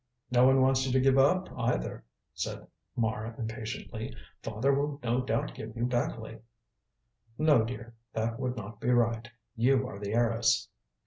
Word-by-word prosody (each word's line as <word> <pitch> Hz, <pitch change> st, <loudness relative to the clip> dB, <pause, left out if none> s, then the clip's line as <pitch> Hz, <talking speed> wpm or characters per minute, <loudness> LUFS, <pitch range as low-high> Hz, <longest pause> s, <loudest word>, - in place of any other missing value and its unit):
"No 125 Hz, +1 st, +6 dB
one 135 Hz, 0 st, +5 dB
wants 130 Hz, 0 st, +4 dB
you -, -, 0 dB
to 130 Hz, -, +4 dB
give 135 Hz, +1 st, +4 dB
up 180 Hz, +7 st, +4 dB
either," 125 Hz, 0 st, -1 dB, 0.3 s
said -, -, -4 dB, 0.3 s
Mara 110 Hz, -1 st, -1 dB
impatiently. 110 Hz, 0 st, -5 dB, 0.3 s
"Father 115 Hz, +6 st, +1 dB
will 140 Hz, +1 st, -1 dB
no 120 Hz, +2 st, +1 dB
doubt 115 Hz, -2 st, -1 dB
give -, -, -8 dB
you 120 Hz, -, +1 dB
Beckleigh." 115 Hz, -2 st, -2 dB, 1.0 s
"No, 150 Hz, -7 st, +5 dB
dear. 115 Hz, 0 st, -6 dB, 0.2 s
That 115 Hz, +1 st, -1 dB
would 125 Hz, -2 st, -2 dB
not 105 Hz, 0 st, -7 dB
be 125 Hz, -, -1 dB
right. 115 Hz, -1 st, +2 dB, 0.3 s
You 130 Hz, +2 st, +3 dB
are 100 Hz, -, -8 dB
the 100 Hz, 0 st, -3 dB
heiress." 115 Hz, -1 st, +2 dB
120 Hz, 155 wpm, -30 LUFS, 115-130 Hz, 1.0 s, No